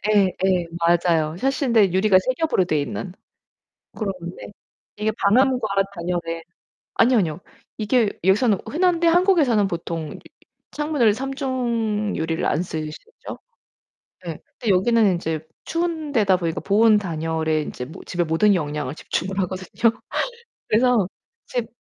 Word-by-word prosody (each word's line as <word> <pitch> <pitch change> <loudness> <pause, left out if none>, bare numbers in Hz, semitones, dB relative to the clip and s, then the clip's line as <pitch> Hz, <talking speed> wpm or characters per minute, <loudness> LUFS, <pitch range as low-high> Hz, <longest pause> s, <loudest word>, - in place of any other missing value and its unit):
예 200 -2 +5 0.2
예. 185 -2 +2
맞아요. 170 -2 +2
샤시인데 235 - +2
유리가 190 0 +4
3 255 +8 -1
겹으로 315 - +2
돼 155 -4 0
있는. 180 +5 -5 0.8
그런데 185 -5 -5 0.5
이게 215 +1 0
방음과 250 +2 +3 0.3
단열에 170 -2 -3 0.5
아니요, 245 +1 +4
아니요. 170 -4 -1 0.4
이게 220 0 +2
여기서는 200 +2 +3
흔한데 345 +1 +1
한국에서는 330 - +3
보통 165 -3 -5 0.5
창문을 295 -8 +2
3 270 +4 -4
중 235 -6 -1
유리를 160 +1 -2
안 155 - +1
쓰시죠? 160 - -7 0.9
예. 165 -3 -5 0.2
근데 230 - 0
여기는 215 +1 +3
인제 160 -3 -2 0.2
추운 330 -3 -2
데다 200 -7 +3
보니까 165 -2 -2
보온 215 +2 +4
단열에 160 -4 -1
인제 125 -2 -7 0.2
집에 175 -1 -1
모든 170 +6 +3
역량을 150 -4 -2
집중 180 - -3
하거든요. 190 +4 0 0.8
그래서 225 -4 +3 0.4
집 240 -2 -2
200 Hz, 280 characters per minute, -22 LUFS, 170-245 Hz, 0.9 s, 예